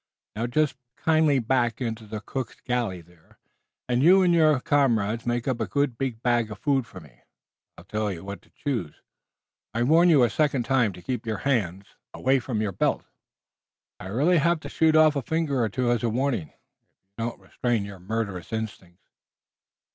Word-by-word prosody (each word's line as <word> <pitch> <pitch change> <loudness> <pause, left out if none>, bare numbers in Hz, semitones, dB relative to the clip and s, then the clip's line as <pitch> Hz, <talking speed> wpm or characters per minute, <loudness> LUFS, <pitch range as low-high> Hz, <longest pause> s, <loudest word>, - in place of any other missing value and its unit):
Now, 115 +3 -2
just 150 +1 0 0.2
kindly 155 -3 +3
back 120 -1 +1
into 115 -3 -4
the 105 0 -6
cook's 130 0 -5
galley 120 -8 -2
there, 85 -1 -24 0.5
and 125 0 +1
you 185 +5 +6
and 175 -1 +3
your 155 -4 +4
comrades 120 -6 +1
make 120 +1 -1
up 125 -3 -1
a 110 - -1
good 140 +4 0
big 120 -2 -4
bag 120 -2 +2
of 105 - -7
food 135 +1 0
for - - -11
me. 65 -6 -18 0.6
I'll - - -12
tell 105 +2 -2
you 85 -2 -7
what 100 +1 -7
to - - -26
choose. 120 - -4 0.8
I 120 - +1
warn 165 +7 +5
you 145 -6 +6
a 120 - +3
second 145 -3 +1
time 125 -4 +2
to 90 - -13
keep 120 +3 -4
your 110 -2 -1
hands 100 -8 0 0.3
away 135 +1 +2
from 115 -3 -2
your 105 - -1
belt. 90 - 0 0.9
I'll 95 +1 -7
really 165 +7 +4
have 170 +2 +2
to - - -7
shoot 160 -1 +2
off 155 -1 +6
a 140 - 0
finger 145 -1 -1
or 110 - 0
two 120 +3 0
as 120 - +1
a 120 - 0
warning, 120 - -1
if - - -28
you - - -38 0.6
don't 115 +1 -3
restrain 120 -5 -2
your 100 -2 -9
murderous 100 -2 -4
instincts. 105 -5 -6
120 Hz, 195 wpm, -25 LUFS, 105-140 Hz, 0.9 s, you